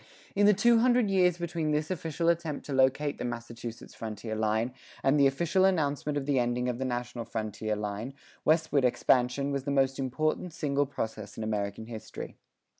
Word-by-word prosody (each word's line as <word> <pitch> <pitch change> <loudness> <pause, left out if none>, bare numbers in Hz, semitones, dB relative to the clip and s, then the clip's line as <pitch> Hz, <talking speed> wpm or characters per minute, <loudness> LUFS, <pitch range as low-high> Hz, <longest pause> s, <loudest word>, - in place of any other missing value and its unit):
[39:2] - - -29
In 205 - +5
the 210 - +7
two 235 +3 +5
hundred 240 -3 +3
years 180 -3 +4
between 170 -2 -2
this 150 +2 0
official 165 -1 -2
attempt 165 -3 0
to 145 - -4
locate 135 +2 +2
the - - -3
Massachusetts 120 -1 -6
frontier 110 0 -5
line, 110 +3 0 0.3
and 140 +2 +4
the 140 - +7
official 170 +7 +1
announcement 150 -5 +1
of 140 - -2
the 140 -2 +2
ending 120 +1 0
of 125 -1 -2
the 130 - -1
national 120 -1 -3
frontier 110 -1 -3
line, 105 +5 -4 0.3
westward 155 -3 +3
expansion 125 +2 +2
was 140 -1 -2
the - - -2
most 135 -1 +2
important 155 +6 -1
single 145 -3 0
process 110 -6 -5
in 110 - -3
American 105 0 -2
history. 110 -1 -8
135 Hz, 185 wpm, -29 LUFS, 115-155 Hz, 0.3 s, the